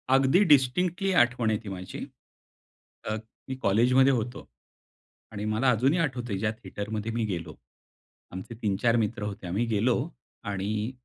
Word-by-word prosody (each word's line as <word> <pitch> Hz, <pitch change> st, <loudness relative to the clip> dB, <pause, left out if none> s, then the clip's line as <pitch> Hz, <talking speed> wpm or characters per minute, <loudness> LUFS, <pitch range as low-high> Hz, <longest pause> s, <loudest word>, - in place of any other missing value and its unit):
अगदी 135 Hz, +9 st, +5 dB
डिस्टिंक्टली 170 Hz, +8 st, +3 dB
आठवण 120 Hz, -2 st, +1 dB
आहे 105 Hz, -1 st, +1 dB
ती 105 Hz, -, -6 dB
माझी. 95 Hz, -1 st, -6 dB, 1.0 s
अ, 110 Hz, -, -1 dB, 0.3 s
मी 130 Hz, -, -2 dB
कॉलेजमध्ये 125 Hz, +7 st, +4 dB
होतो. 120 Hz, 0 st, -3 dB, 0.8 s
आणि 105 Hz, 0 st, -5 dB
मला 110 Hz, +5 st, +2 dB
अजूनही 130 Hz, +9 st, +2 dB
आठवतंय 125 Hz, -9 st, -1 dB
ज्या 105 Hz, +1 st, 0 dB
थिएटरमध्ये 110 Hz, 0 st, -5 dB
मी 115 Hz, -1 st, 0 dB
गेलो. 85 Hz, -6 st, -4 dB, 0.8 s
आमचे 95 Hz, +6 st, -7 dB
तीन 100 Hz, -3 st, +1 dB
चार 115 Hz, +3 st, +2 dB
मित्र 105 Hz, -2 st, -1 dB
होते 100 Hz, -2 st, -5 dB
आम्ही 100 Hz, +7 st, 0 dB
गेलो 115 Hz, +2 st, +2 dB, 0.5 s
आणि 105 Hz, +4 st, -2 dB
110 Hz, 140 wpm, -27 LUFS, 105-125 Hz, 1.0 s, अगदी